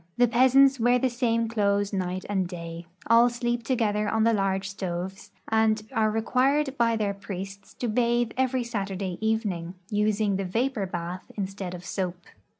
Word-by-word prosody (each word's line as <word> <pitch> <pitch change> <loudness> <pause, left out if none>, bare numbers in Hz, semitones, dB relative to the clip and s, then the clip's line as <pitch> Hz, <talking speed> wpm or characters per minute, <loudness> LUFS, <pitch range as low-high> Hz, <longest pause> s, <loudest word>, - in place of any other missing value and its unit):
The 245 0 +5
peasants 260 +3 +5
Avear 245 +2 +4
the 255 0 +1
same 230 -2 +1
clothes 205 -2 +1
night 185 0 -2
and 190 -3 0
da}'; 170 -1 -7 0.2
all 230 +2 +6
sleep 240 0 -2
together 215 -4 0
on 220 0 +1
the 230 0 +4
large 195 -1 0
stoves, 190 -1 -5 0.2
and 220 -1 +2
are 220 -4 +2
required 265 +6 +1
by 230 -3 +2
their 210 -2 0
])riests 195 0 -8
to 245 - -2
bathe 240 0 +1
every 260 -1 +1
Saturday 195 -5 -3
evening, 205 -6 -1 0.2
using 210 -1 +1
the 195 - -2
vapor 225 +2 -1
bath 175 0 -6
instead 195 -2 -4
of 175 0 -10
soap. 185 -2 -3
215 Hz, 160 wpm, -26 LUFS, 195-240 Hz, 0.2 s, all